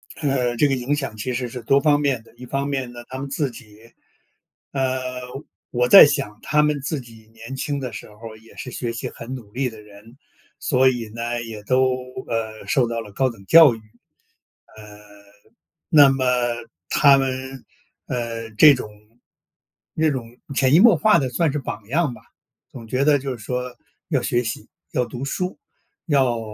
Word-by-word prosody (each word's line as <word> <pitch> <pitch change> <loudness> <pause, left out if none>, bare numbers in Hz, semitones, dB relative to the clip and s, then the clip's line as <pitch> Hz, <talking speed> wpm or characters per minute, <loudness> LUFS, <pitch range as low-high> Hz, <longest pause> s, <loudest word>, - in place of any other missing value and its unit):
呃， 130 -5 0
这 145 - +4
个 135 - 0
影 130 +3 -1
响 135 -6 -4
其 125 +4 -4
实 125 0 -2
是 125 +1 -8
多 135 +5 +3
方 145 0 +3
面 135 -6 0
的。 - - -21
一 125 +1 -11
方 135 +2 -2
面 135 -3 -3
呢， 120 0 -10
他 130 - -7
们 140 0 -5
自 140 -1 -1
己， 115 -1 -15 0.8
呃， 130 -1 -1 0.7
我 125 0 +1
在 195 - +11
想 140 -7 -2
他 150 +1 +2
们 150 -2 0
自 145 +2 -3
己 110 -2 -16
年 115 +4 -9
轻 140 +1 -3
的 125 -3 -5
时 - - -9
候， 110 +1 -11
也 110 +1 -19
是 125 - -7
学 120 0 -3
习 115 - -5
很 120 +3 -8
努 115 -6 -11
力 130 +3 -1
的 110 -2 -13
人。 105 +4 -17 0.4
所 130 -1 +3
以 120 -4 -4
呢， 120 +1 -3
也 110 -2 -8
都， 130 +4 +2 0.4
呃， 110 -1 -4
受 130 -4 +2
到 115 0 -3
了 105 -2 -11
高 130 +4 +1
等 105 -5 -13
教 155 -2 +7
育。 - - -11 1.0
呃， 105 -1 -12 0.9
那 145 -3 +7
么， 135 -1 0 0.6
他 140 -2 +6
们， 130 0 -3 0.4
呃， 115 -2 -4
这 145 +7 +7
种 125 -5 -5 1.0
那 160 0 +2
种 120 -3 -6 0.2
潜 135 0 +3
移 165 - +7
默 220 -3 +7
化 210 -2 +4
地 130 - -1
算 150 +4 +1
是 150 - -2
榜 105 -5 -7
样 155 +1 +1
吧， 110 - -16 0.5
总 115 -3 -10
觉 130 +4 0
得 145 -2 +4
就 130 -2 -5
是 110 - -13
说 125 +1 -4 0.3
要 - - +2
学 120 0 0
习， 115 - -5 0.3
要 125 - +1
读 120 +3 -7
书， 180 +6 -3 0.5
要 130 -6 +2
125 Hz, 200 characters per minute, -22 LUFS, 115-140 Hz, 1.0 s, 在